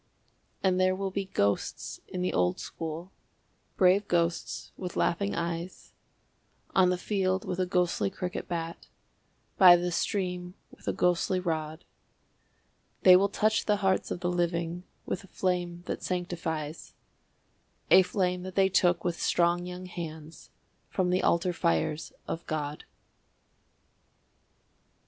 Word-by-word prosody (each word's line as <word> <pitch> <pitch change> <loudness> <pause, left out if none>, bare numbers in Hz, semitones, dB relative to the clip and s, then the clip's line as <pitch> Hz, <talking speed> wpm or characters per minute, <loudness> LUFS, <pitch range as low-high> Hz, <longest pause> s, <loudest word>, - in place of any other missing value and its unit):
And 185 -1 +3
there 185 0 +3
will 195 0 -3
be 195 +1 -2
ghosts 100 - -1
in 180 -1 -4
the 180 - 0
old 90 0 +1
school, 165 +3 -6 0.7
brave 190 +2 +4
ghosts 170 -2 -1
with 180 -2 -6
laughing 200 +4 0
eyes, 170 +1 -4 0.8
On 185 -1 +5
the 180 - +1
field 190 -1 0
with 180 0 -3
a 185 - +1
ghostly 180 - +1
cricket 180 - -5
bat, 170 -1 -5 0.7
by 180 -3 +10
the 175 0 -1
stream 180 0 -2 0.2
with - - -17
a - - +3
ghostly 180 +1 +1
rod; 160 -2 -3 1.2
They 185 -1 +9
will 195 +2 +4
touch 215 +2 +1
the 210 - +4
hearts 190 -1 +2
of 175 - -4
the 175 - 0
living 175 0 -1 0.2
with 185 - -3
a - - -14
flame 175 -2 -2
that - - -4
sanctifies, 165 -4 -4 1.0
A 185 +2 +9
flame 180 -1 0
that 185 0 -7
they 195 -1 +4
took 175 -2 +3
with 175 -1 -2
strong 175 +1 +2
young 180 +1 -7
hands 160 -3 -8 0.4
from 180 -2 0
the 185 - +2
altar 175 +1 +2
fires 150 - 0 0.2
of 165 - -4
God. 150 -1 -3
180 Hz, 135 wpm, -29 LUFS, 170-185 Hz, 1.2 s, by